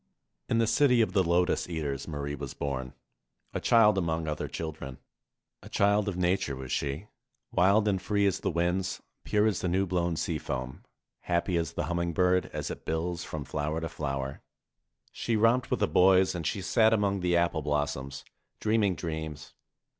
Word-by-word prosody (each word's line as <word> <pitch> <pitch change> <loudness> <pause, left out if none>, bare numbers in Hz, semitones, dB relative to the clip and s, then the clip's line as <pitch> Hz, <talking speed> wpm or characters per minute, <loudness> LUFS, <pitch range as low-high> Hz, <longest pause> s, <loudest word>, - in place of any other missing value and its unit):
In 115 - +2
the 115 - +3
city 125 +2 +4
of 95 -5 +1
the 100 - +4
Lotus 90 +1 +1
eaters 75 -5 -3
Marie 75 -2 -4
was 70 -2 -6
born, 65 -3 -4 0.6
a - - -1
child 105 -4 +5
among 80 -2 -1
other 75 0 -2
children. 75 -5 -6 0.6
A - - -12
child 100 +1 +2
of 95 - -4
Hature 90 -5 0
was 65 -1 -7
she, 70 +8 -2 0.4
wild 100 +4 +4
and 95 -3 +1
free 100 +1 +1
as 100 - +1
the - - -1
winds, 90 +2 -1 0.2
pure 105 0 +2
as 110 -3 +1
the - - -1
new 95 +3 +1
blown 85 -2 0
sea 80 0 -2
foam, 65 -1 -5 0.4
happy 90 +1 0
as 85 -1 -1
the - - -2
humming 85 -1 -1
bird 90 +1 +2
as - - -4
it - - -8
bills 85 +2 -2
from 75 -3 -6
flower 75 +2 -2
to 80 0 -4
flower. 70 -3 -4 0.7
She 115 - -2
romped 115 +3 +3
with - - -1
the - - +3
boys 95 +1 +5
and 85 -3 -3
she 95 +3 -2
sat 110 +2 +4
among 100 -2 +1
the 90 -1 +2
apple 85 -2 +1
blossoms, 75 -2 -2 0.3
dreaming 105 -3 +2
dreams. 80 -2 -5
85 Hz, 180 wpm, -29 LUFS, 75-100 Hz, 0.7 s, child